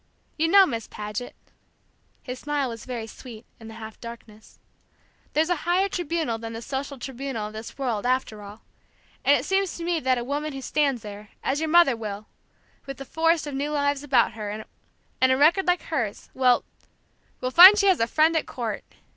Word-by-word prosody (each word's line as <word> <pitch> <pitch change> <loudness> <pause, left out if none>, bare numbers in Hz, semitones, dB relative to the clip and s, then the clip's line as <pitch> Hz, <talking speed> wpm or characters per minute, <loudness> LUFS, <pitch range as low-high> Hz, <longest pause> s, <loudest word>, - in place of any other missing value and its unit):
You 325 +1 +1
know, 390 +3 +7
Miss 230 -9 -4
Paget," 210 +3 -6 0.9
his 250 0 -6
smile 290 -3 -1
was 230 -2 -8
very 240 -3 -4
sweet, 225 0 -11
in 225 - -11
the 225 - -10
half 220 -1 -10
darkness, 230 -2 -12 0.8
"there's 320 +3 +1
a 355 - +2
higher 355 +5 +1
tribunal 325 -10 -2
than 225 0 -7
the 225 - -6
social 275 +2 -4
tribunal 260 -3 -5
of 210 - -8
this 220 +1 -9
world, 240 -7 -2
after 250 -4 -1
all; 205 +2 -12 0.6
and - - +5
it - - -6
seems 385 -1 0
to 340 - -6
me 340 -1 0
that 260 -2 +1
a 240 - -3
woman 290 +3 -3
who 270 - -6
stands 280 -6 0
there, 210 0 -9
as 275 +2 0
your 320 0 -2
mother 340 -6 +5
will, 210 -2 -6 0.6
with 275 0 -7
a 275 - -7
forest 325 +2 +1
of 290 - -6
new 280 +2 -2
lives 285 -1 0
about 265 -5 +2
her, 215 -2 -6 0.7
and 260 0 +5
a 260 - +3
record 335 +7 +4
like 355 0 +2
hers, 235 -10 -4
will 250 -2 +3 0.8
will 255 - -3
find 370 +7 +10
she 405 - +2
has 380 -3 +4
a 230 - +2
Friend 315 +5 +3
at 320 - 0
court!" 225 -5 -4
265 Hz, 195 wpm, -25 LUFS, 225-315 Hz, 0.9 s, find